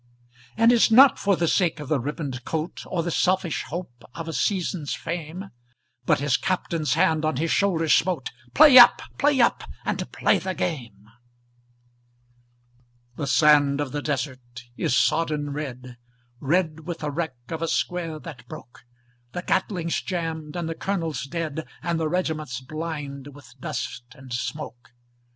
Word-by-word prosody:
And 230 Hz, +1 st, +6 dB
it's 240 Hz, -1 st, +5 dB
not 255 Hz, +4 st, +7 dB
for 200 Hz, -1 st, +2 dB
the 170 Hz, -1 st, 0 dB
sake 170 Hz, -2 st, +1 dB
of 150 Hz, -1 st, -7 dB
a 150 Hz, -, +3 dB
ribboned 135 Hz, -2 st, -4 dB
coat, 160 Hz, +4 st, -4 dB
Or 170 Hz, -3 st, -1 dB
the 175 Hz, -, -2 dB
selfish 185 Hz, -1 st, +1 dB
hope 130 Hz, -4 st, -7 dB
of 165 Hz, -1 st, -6 dB
a 165 Hz, -, -4 dB
season's 170 Hz, -1 st, -1 dB
fame, 170 Hz, +3 st, -6 dB, 0.6 s
But -, -, +3 dB
his 140 Hz, 0 st, +2 dB
Captain's 165 Hz, -4 st, -1 dB
hand 160 Hz, -1 st, +2 dB
on 155 Hz, -2 st, 0 dB
his 165 Hz, +3 st, 0 dB
shoulder 175 Hz, -5 st, +2 dB
smote 165 Hz, -3 st, +2 dB, 0.2 s
"Play 275 Hz, -4 st, +9 dB
up! 240 Hz, -, +8 dB, 0.2 s
play 285 Hz, -2 st, +3 dB
up! 235 Hz, -, +2 dB, 0.2 s
and -, -, -3 dB
play -, -, +2 dB
the 185 Hz, -1 st, -4 dB
game!" 115 Hz, -, -4 dB, 2.1 s
The 140 Hz, -, -4 dB
sand 145 Hz, -1 st, +4 dB
of 145 Hz, -3 st, -2 dB
the 145 Hz, -, -3 dB
desert 130 Hz, -5 st, -4 dB
is 125 Hz, -, +1 dB
sodden 150 Hz, -3 st, +1 dB
red, 130 Hz, -4 st, -6 dB, 0.4 s
Red 160 Hz, +2 st, 0 dB
with 170 Hz, -2 st, -3 dB
the 150 Hz, -1 st, -2 dB
wreck 160 Hz, -2 st, -3 dB
of 160 Hz, -1 st, -4 dB
a 165 Hz, -, 0 dB
square 165 Hz, -2 st, -1 dB
that 145 Hz, -8 st, -10 dB
broke; 120 Hz, -, -12 dB, 0.5 s
The 180 Hz, -, -4 dB
Gatling's 175 Hz, -4 st, -1 dB
jammed 165 Hz, -3 st, -4 dB
and 170 Hz, -2 st, -3 dB
the 165 Hz, -, -2 dB
colonel 165 Hz, -2 st, -2 dB, 0.2 s
dead, 160 Hz, -1 st, -4 dB, 0.2 s
And 170 Hz, -1 st, -1 dB
the 160 Hz, -1 st, 0 dB
regiment 160 Hz, -5 st, -2 dB, 0.2 s
blind 145 Hz, -3 st, -6 dB
with 140 Hz, -3 st, -15 dB
dust 120 Hz, -1 st, -5 dB
and 130 Hz, -2 st, -10 dB
smoke. 120 Hz, 0 st, -5 dB
160 Hz, 155 wpm, -24 LUFS, 140-175 Hz, 2.1 s, Play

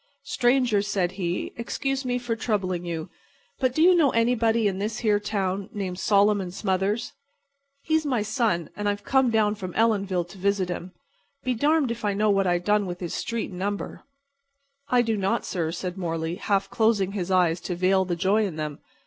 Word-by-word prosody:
"Stranger," 245 Hz, -4 st, +2 dB
said 195 Hz, -3 st, 0 dB
he, 180 Hz, -2 st, -3 dB
"excuse 270 Hz, +3 st, -2 dB
me 245 Hz, 0 st, 0 dB
for 240 Hz, -2 st, -2 dB
troubling 190 Hz, -6 st, -1 dB
you, 165 Hz, -2 st, -4 dB, 0.5 s
but 255 Hz, -1 st, +1 dB
do 315 Hz, -, +4 dB
you 365 Hz, +1 st, +7 dB
know 325 Hz, -5 st, +4 dB
anybody 230 Hz, -2 st, +2 dB
in 190 Hz, -1 st, -2 dB
this 215 Hz, +2 st, -3 dB
here 210 Hz, -1 st, +4 dB
town 200 Hz, -2 st, -2 dB
named 190 Hz, -3 st, -4 dB
Solomon 200 Hz, -2 st, +3 dB
Smothers? 195 Hz, +4 st, -1 dB, 0.7 s
He's 315 Hz, 0 st, +1 dB
my 255 Hz, -7 st, 0 dB
son, 215 Hz, -, 0 dB
and 205 Hz, 0 st, -1 dB
I've 205 Hz, 0 st, -3 dB
come 265 Hz, +1 st, +3 dB
down 215 Hz, -2 st, +2 dB
from 185 Hz, -4 st, -7 dB
Ellenville 200 Hz, -5 st, +2 dB
to 195 Hz, -, -12 dB
visit 195 Hz, -1 st, +1 dB
him. 180 Hz, +1 st, -5 dB, 0.5 s
Be 255 Hz, -, 0 dB
darned 290 Hz, +1 st, +2 dB
if 235 Hz, 0 st, -6 dB
I 205 Hz, -1 st, 0 dB
know 210 Hz, +1 st, +3 dB
what 195 Hz, -1 st, +2 dB
I 175 Hz, 0 st, +3 dB
done 205 Hz, +3 st, +1 dB
with 175 Hz, 0 st, -5 dB
his 175 Hz, -2 st, -4 dB
street 230 Hz, -3 st, -3 dB
and 180 Hz, -, -8 dB
number." 200 Hz, +1 st, -3 dB, 0.9 s
"I 245 Hz, -1 st, +4 dB
do 225 Hz, -1 st, 0 dB
not, 195 Hz, -1 st, 0 dB
sir," 165 Hz, -4 st, -2 dB
said 180 Hz, +2 st, -5 dB
Morley, 165 Hz, -1 st, -2 dB
half 200 Hz, -2 st, 0 dB
closing 220 Hz, -4 st, +2 dB
his 190 Hz, -3 st, -3 dB
eyes 180 Hz, -2 st, +2 dB
to 180 Hz, -, -3 dB
veil 190 Hz, +2 st, +3 dB
the 180 Hz, -2 st, -2 dB
joy 200 Hz, +4 st, +2 dB
in 175 Hz, -, -6 dB
them. 150 Hz, -2 st, -4 dB
200 Hz, 190 wpm, -25 LUFS, 185-230 Hz, 0.9 s, you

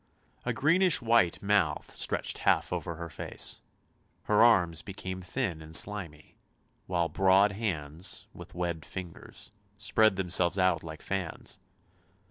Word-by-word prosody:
A 125 Hz, -, 0 dB
greenish 165 Hz, +8 st, +3 dB
white 115 Hz, -8 st, +2 dB
mouth 100 Hz, -7 st, +1 dB
stretched -, -, -1 dB
half -, -, +2 dB
over 85 Hz, -, -3 dB
her 85 Hz, +1 st, -6 dB
face; 75 Hz, -, -2 dB, 0.6 s
her 105 Hz, -, +3 dB
arms 90 Hz, -9 st, +4 dB
became 95 Hz, -2 st, -7 dB
thin 90 Hz, -3 st, -3 dB
and 80 Hz, +1 st, -4 dB
slimy; 85 Hz, -8 st, 0 dB, 0.5 s
while 85 Hz, -2 st, 0 dB
broad 95 Hz, +3 st, +4 dB
hands, 85 Hz, -6 st, -4 dB
with -, -, -12 dB
webbed 85 Hz, -3 st, -3 dB
fingers, 90 Hz, +1 st, -9 dB, 0.3 s
spread 105 Hz, +1 st, +3 dB
themselves 90 Hz, -1 st, +1 dB
out 90 Hz, -3 st, +2 dB
like 80 Hz, -1 st, -9 dB
fans. 95 Hz, -4 st, -4 dB
95 Hz, 125 wpm, -29 LUFS, 85-105 Hz, 0.6 s, arms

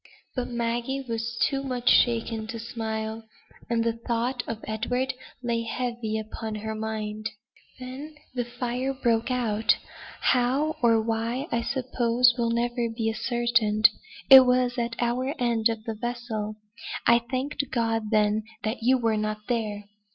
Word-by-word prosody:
But 250 Hz, -2 st, -1 dB
Maggie 240 Hz, +3 st, -2 dB
was 230 Hz, 0 st, -3 dB
too 275 Hz, -1 st, -2 dB
much 250 Hz, -2 st, -4 dB
shaken 225 Hz, -2 st, +3 dB
to 230 Hz, +1 st, -5 dB
smile; 220 Hz, -1 st, -4 dB, 0.5 s
and 230 Hz, -1 st, +2 dB
the 230 Hz, 0 st, +1 dB
thought 235 Hz, +2 st, -1 dB
of 225 Hz, -1 st, -5 dB
Edward 245 Hz, +5 st, -1 dB, 0.3 s
lay 235 Hz, -1 st, 0 dB
heavy 230 Hz, -1 st, -2 dB
upon 220 Hz, 0 st, -5 dB
her 220 Hz, +1 st, -4 dB
mind. 215 Hz, 0 st, -3 dB, 0.5 s
"Then 265 Hz, +5 st, -8 dB, 0.2 s
the 245 Hz, -1 st, -1 dB
fire 245 Hz, +2 st, -3 dB
broke 235 Hz, -2 st, +1 dB
out; 225 Hz, -4 st, +2 dB, 0.4 s
how, 265 Hz, +5 st, +2 dB
or 230 Hz, -2 st, +5 dB
why, 230 Hz, +5 st, -1 dB
I 235 Hz, -, +1 dB
suppose 245 Hz, -1 st, +2 dB
will 235 Hz, -2 st, 0 dB
never 240 Hz, +1 st, 0 dB
be 225 Hz, -1 st, -1 dB
ascertained. 230 Hz, -2 st, +3 dB, 0.4 s
It 265 Hz, -1 st, +10 dB
was 250 Hz, -1 st, +3 dB
at 235 Hz, -1 st, -1 dB
our 250 Hz, +4 st, 0 dB
end 235 Hz, -2 st, +2 dB
of 225 Hz, -1 st, -3 dB
the 225 Hz, -, -3 dB
vessel. 220 Hz, -2 st, -4 dB, 0.5 s
I 235 Hz, 0 st, +6 dB
thanked 270 Hz, +1 st, -2 dB
God, 225 Hz, -2 st, 0 dB
then, 215 Hz, 0 st, +3 dB, 0.2 s
that 225 Hz, +2 st, -2 dB
you 255 Hz, +3 st, +4 dB
were 225 Hz, -3 st, +1 dB
not 215 Hz, 0 st, -2 dB
there. 215 Hz, -4 st, -1 dB
235 Hz, 145 wpm, -26 LUFS, 220-250 Hz, 0.5 s, It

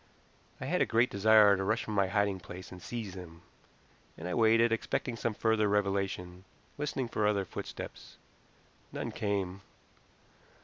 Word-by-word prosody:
I -, -, -5 dB
had -, -, 0 dB
a -, -, +3 dB
great 115 Hz, +2 st, +3 dB
desire 105 Hz, 0 st, +6 dB
to 95 Hz, -, -2 dB
rush 110 Hz, +4 st, 0 dB
from 110 Hz, -, -5 dB
my 100 Hz, -2 st, +3 dB
hiding 100 Hz, 0 st, +1 dB
place 90 Hz, +1 st, -10 dB
and 90 Hz, -1 st, -10 dB
seize 110 Hz, -4 st, -5 dB
him, 85 Hz, -2 st, -10 dB, 0.7 s
and 85 Hz, -, -6 dB
I 90 Hz, -, -2 dB
waited, 115 Hz, 0 st, +4 dB
expecting 115 Hz, +2 st, -1 dB
some 115 Hz, -1 st, -2 dB
further 110 Hz, -2 st, +2 dB
revelation, 95 Hz, -3 st, -1 dB, 0.3 s
listening 140 Hz, -3 st, -2 dB
for 105 Hz, -2 st, 0 dB
other 100 Hz, -2 st, +1 dB
footsteps. -, -, -8 dB, 0.7 s
None -, -, -4 dB
came. 100 Hz, -2 st, -2 dB
100 Hz, 150 wpm, -31 LUFS, 95-110 Hz, 0.7 s, desire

